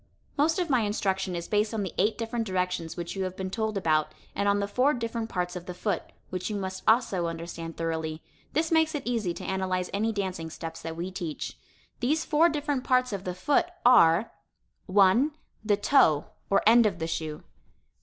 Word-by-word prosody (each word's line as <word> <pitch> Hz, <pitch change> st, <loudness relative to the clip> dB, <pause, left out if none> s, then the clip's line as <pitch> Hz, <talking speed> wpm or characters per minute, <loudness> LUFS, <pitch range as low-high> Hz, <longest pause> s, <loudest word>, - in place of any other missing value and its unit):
Most 310 Hz, +5 st, +2 dB
of 360 Hz, -2 st, 0 dB
my 260 Hz, -5 st, +3 dB
instruction 195 Hz, -3 st, -1 dB
is 170 Hz, 0 st, -4 dB
based 210 Hz, +1 st, +1 dB
on 210 Hz, -, -1 dB
the 185 Hz, -, -5 dB
eight 210 Hz, +4 st, +2 dB
different 230 Hz, 0 st, -2 dB
directions 180 Hz, -3 st, -2 dB
which 170 Hz, +2 st, -5 dB
you 195 Hz, -, -1 dB
have 185 Hz, 0 st, -4 dB
been 190 Hz, -1 st, -4 dB
told 220 Hz, 0 st, -1 dB
about, 155 Hz, -4 st, +1 dB, 0.2 s
and 200 Hz, -, +1 dB
on 200 Hz, 0 st, +3 dB
the 200 Hz, -, -1 dB
four 255 Hz, +8 st, +2 dB
different 230 Hz, -1 st, -3 dB
parts 180 Hz, -1 st, -2 dB
of 180 Hz, 0 st, -7 dB
the 180 Hz, -, -5 dB
foot, 205 Hz, +3 st, -1 dB, 0.3 s
which 185 Hz, +1 st, -3 dB
you 210 Hz, -, -3 dB
must 190 Hz, -1 st, -4 dB
also 220 Hz, -7 st, +3 dB
understand 165 Hz, 0 st, -6 dB
thoroughly. 160 Hz, -1 st, -3 dB, 0.3 s
This 320 Hz, +2 st, 0 dB
makes 320 Hz, -1 st, +3 dB
it 290 Hz, -, -3 dB
easy 230 Hz, -7 st, 0 dB
to -, -, -7 dB
analyze 185 Hz, -1 st, -1 dB
any 220 Hz, +3 st, +1 dB
dancing 185 Hz, -6 st, -3 dB
steps 165 Hz, 0 st, -7 dB
that 165 Hz, 0 st, -5 dB
we 175 Hz, +3 st, -4 dB
teach. 170 Hz, -4 st, -5 dB, 0.4 s
These 300 Hz, +6 st, +1 dB
four 320 Hz, +3 st, +4 dB
different 290 Hz, -4 st, -1 dB
parts 255 Hz, -3 st, +2 dB
of 195 Hz, -1 st, -4 dB
the 180 Hz, -1 st, -3 dB
foot 310 Hz, -, +2 dB, 0.2 s
are: 210 Hz, -5 st, +6 dB, 0.6 s
1, 200 Hz, +10 st, +4 dB, 0.3 s
the 210 Hz, -2 st, +2 dB
toe, 200 Hz, -, +3 dB, 0.2 s
or 195 Hz, -, +3 dB
end 230 Hz, +1 st, +7 dB
of 195 Hz, -, -2 dB
the 160 Hz, -, -3 dB
shoe. 160 Hz, -2 st, -4 dB
195 Hz, 200 wpm, -28 LUFS, 175-235 Hz, 0.6 s, end